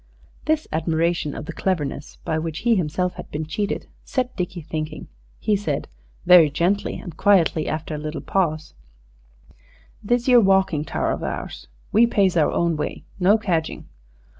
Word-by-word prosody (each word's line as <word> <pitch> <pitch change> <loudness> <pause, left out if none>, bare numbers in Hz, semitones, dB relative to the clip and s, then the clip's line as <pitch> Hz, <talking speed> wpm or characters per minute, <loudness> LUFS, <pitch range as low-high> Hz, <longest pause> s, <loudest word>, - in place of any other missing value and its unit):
This 310 0 +1
admiration 165 0 0
of - - -6
the - - -6
cleverness 165 -8 -2
by 160 - 0
which 160 -1 -4
he 235 - +5
himself 180 -1 0
had - - -8
been 155 +1 -4
cheated 200 +7 -2 0.2
set 255 -1 -2
Dickie 180 -2 -4
thinking. 155 0 -5 0.3
He 210 - +1
said, 175 -8 -2 0.4
very 175 -4 +8
gently 175 +7 0
and 175 -4 -9
quietly, 170 -5 +3
after 155 +1 -3
a 150 - -3
little 155 +1 -5
pause 160 -5 -1 1.3
"This 240 +3 0
'ere 245 -2 +7
walking 190 -6 +2
tower - - -1
of - - -3
ours. - - -5 0.2
We 230 +3 +5
pays 195 -6 +2
our 160 -3 +3
own 170 -2 +1
way? 150 - -4 0.2
No 195 +4 +5
cadging?" 170 -7 -2
170 Hz, 160 wpm, -23 LUFS, 155-200 Hz, 1.3 s, very